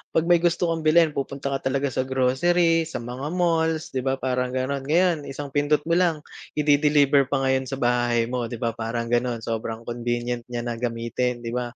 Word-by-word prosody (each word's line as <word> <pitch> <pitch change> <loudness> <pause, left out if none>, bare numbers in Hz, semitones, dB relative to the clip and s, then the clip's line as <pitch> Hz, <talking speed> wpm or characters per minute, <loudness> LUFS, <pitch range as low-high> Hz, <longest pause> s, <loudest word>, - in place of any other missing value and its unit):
pag 160 - +4
may 175 0 +4
gusto 170 0 +1
kang 160 -1 -2
bilhin 160 0 +5
pupunta 140 0 -4
ka 135 -1 -2
talaga 140 +1 0
sa 130 +1 -2
grocery, 165 +6 +2
sa 120 - -6
mga 125 +4 -5
malls 165 -2 +1
di 130 - -2
ba 130 +1 0
parang 125 -1 -2
gano'n. 135 +1 -2
Ngayon 175 +1 +3
isang 140 0 -6
pindot 145 +1 +1
mo 170 +2 +2
lang 165 -5 +1 0.3
i-de-deliver 145 -2 +4
pa 135 0 0
ngayon 130 0 +1
sa 135 - -3
bahay 120 -2 +1
mo 120 0 -3
'di 120 - -6
ba 115 0 -1
parang 115 +1 -4
gano'n, 120 -1 0
sobrang 115 0 -4
convenient 120 0 -3
niya 120 -1 -4
na 120 -1 -4
gamitin 120 +1 -2
di 115 - -4
ba? 120 0 -3
130 Hz, 200 wpm, -24 LUFS, 120-150 Hz, 0.3 s, bilhin